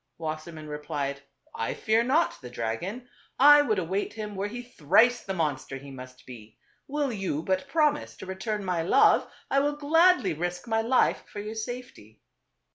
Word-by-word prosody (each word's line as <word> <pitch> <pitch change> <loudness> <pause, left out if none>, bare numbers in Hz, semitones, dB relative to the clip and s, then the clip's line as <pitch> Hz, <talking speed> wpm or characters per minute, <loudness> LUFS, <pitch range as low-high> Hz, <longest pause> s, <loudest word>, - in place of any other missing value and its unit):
Wassermann 155 0 -6
replied, 150 -2 -4 0.2
" - - -34
I 115 - -3
fear 220 +1 +2
not 280 +8 +1
the 125 - -9
dragon; 125 - -4 0.3
I 290 +2 +8
would 220 -7 0
await 185 +3 -2
him 215 -2 -6
were 195 +1 -2
he 240 +3 -7
thrice 240 +3 +3
the 195 - -5
monster 145 -5 -2
he 140 +1 -11
must 130 -1 -11
be. 110 -4 -12 0.3
Will 285 -1 -1
you 185 -7 -3
but 190 +8 -1
promise 295 0 0
to - - -9
return 200 +2 -4
my 180 -2 0
love, 165 - +4 0.2
I 275 - +4
will 290 +1 0
gladly 315 - +3
risk 175 +6 -4
my 225 -1 +1
life 245 +3 +2
for 205 - -7
your 210 +1 -5
safety." 220 - -8
195 Hz, 175 wpm, -27 LUFS, 150-245 Hz, 0.3 s, I